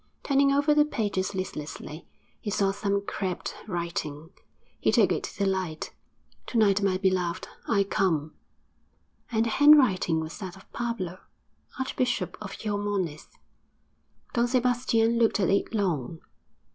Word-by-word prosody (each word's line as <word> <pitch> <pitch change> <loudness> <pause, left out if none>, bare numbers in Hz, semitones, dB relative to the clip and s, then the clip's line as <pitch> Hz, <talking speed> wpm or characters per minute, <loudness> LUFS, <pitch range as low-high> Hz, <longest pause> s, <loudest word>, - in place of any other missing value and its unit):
Turning 275 0 +3
over 285 +2 +3
the 300 0 +5
pages 205 -9 -2
listlessly, 155 -3 -6 0.3
he 210 - -5
saw 195 -1 +2
some 200 0 -1
crabbed 190 -4 -3
writing; 170 -4 -4 0.5
he - - +2
took - - +4
it - - 0
to - - -9
the 200 - +1
light 185 -5 -2 0.5
'To 240 - -2
night, 205 -2 +4
my 195 -2 +2
beloved, 185 -3 0 0.2
I 200 -3 +3
come.' 165 -7 0 1.0
And 225 0 +2
the - - 0
handwriting 255 - +5
was 160 0 -6
that 185 -3 -6
of 190 - -18
Pablo, 195 -7 -3 0.6
Archbishop 255 -2 -1
of 200 -2 -7
Xiormonez. 205 -7 -2 1.1
Don 240 0 +2
Sebastian 245 -2 +2
looked 225 -2 +3
at 190 -2 +2
it 200 - +1
long. 170 - -1
200 Hz, 135 wpm, -27 LUFS, 180-230 Hz, 1.1 s, the